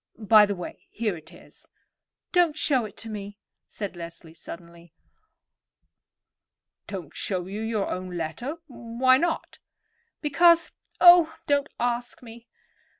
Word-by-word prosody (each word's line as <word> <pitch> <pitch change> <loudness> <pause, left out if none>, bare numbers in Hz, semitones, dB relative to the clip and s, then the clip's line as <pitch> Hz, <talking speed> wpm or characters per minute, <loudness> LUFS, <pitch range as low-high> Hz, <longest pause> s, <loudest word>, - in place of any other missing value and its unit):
By 215 -1 +6
the 200 - -2
way, 180 - -9
here 215 -4 -2
it 160 -1 -14
is." - - -16 0.6
"Don't 345 -5 +3
show 270 -5 +2
it 205 - -11
to 225 - -7
me," 205 -2 -7 0.3
said 200 -3 -6
Leslie 170 -1 -10
suddenly. 170 0 -12 1.9
"Don't 180 -7 -7
show 185 -3 -1
you 200 +3 -6
your 220 -2 -1
own 185 -1 -5
letter? 170 - -4
Why 255 -1 +1
not?" 335 +3 -2 0.6
"Because—oh, 335 +1 +4
don't 285 0 +1
ask 245 +1 -2
me." 235 0 -13
220 Hz, 120 wpm, -25 LUFS, 185-275 Hz, 1.9 s, By